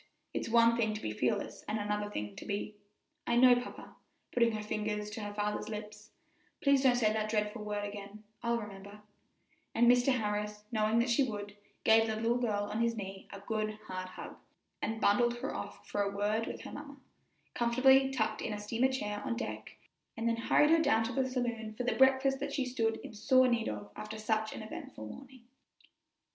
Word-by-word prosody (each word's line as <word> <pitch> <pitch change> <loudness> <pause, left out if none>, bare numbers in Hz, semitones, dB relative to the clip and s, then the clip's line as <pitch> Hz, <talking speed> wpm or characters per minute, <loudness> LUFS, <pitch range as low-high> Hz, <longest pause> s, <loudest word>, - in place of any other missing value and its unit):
It's - - -2
one 230 0 +5
thing 220 -2 +1
to - - -4
be 110 - -3
fearless 120 +3 -1
and 215 - -1
another 210 0 -2
thing 105 - -5
to - - -7
be 205 +1 -3 0.3
" 305 -1 -38
"I 235 - +2
know, 245 0 +7
papa," 245 - -10 0.4
putting 235 -2 +3
her 215 -1 -3
finger 210 0 -2
to 210 +1 -6
her 205 0 -4
father's 210 +1 -2
lips; 210 0 -7 0.5
"please 280 -1 +4
don't 260 -2 +5
say 215 -3 +3
that 215 0 -1
dreadful 210 0 -1
word 205 -1 -2
again; 205 +1 -9 0.2
I'll 235 -1 +1
remember;" 205 -1 -9 0.7
and 235 - +5
Mr. 245 +2 +5
Harris, 210 -1 -2
knowing 215 0 +2
that 235 +2 +2
she 235 - +4
would, 205 -5 -3 0.3
gave 225 0 +5
the 220 - -1
little 230 +2 +1
girl 210 -4 0
on 215 +2 -2
his 235 0 +1
knee 195 -2 -7
a 200 - -8
good, 215 +1 -2
hard 185 0 -5
hug, 185 - -9 0.4
and 220 +1 -2
bundled 240 +3 +3
her - - -4
off - - -7
for 205 - -1
a 200 - +1
word 210 +3 0
with - - -6
her - - -8
mamma, 285 -1 -9 0.6
comfortably 265 +3 +5
tucked 220 -5 -1
up - - -2
in - - -3
a 205 - -4
steamer 230 +5 +1
chair 210 -5 -3
on 235 - -1
deck, - - -6 0.4
and 225 +1 -1
then 230 - +2
hurried 295 +6 +4
her 330 0 +6
down 280 -7 +3
to 230 +3 -3
the 260 +1 +1
saloon 235 -4 -3
for 250 - -3
the 245 - +1
breakfast 265 0 +4
that 280 - -3
she 270 - 0
stood 225 -3 0
in - - -8
sore 255 +4 +4
need 235 -2 +1
of 105 -1 -6
after 215 +1 -6
such 215 0 0
an - - -6
eventful 215 - -8
morning. 260 - -11
220 Hz, 205 wpm, -32 LUFS, 210-245 Hz, 0.7 s, know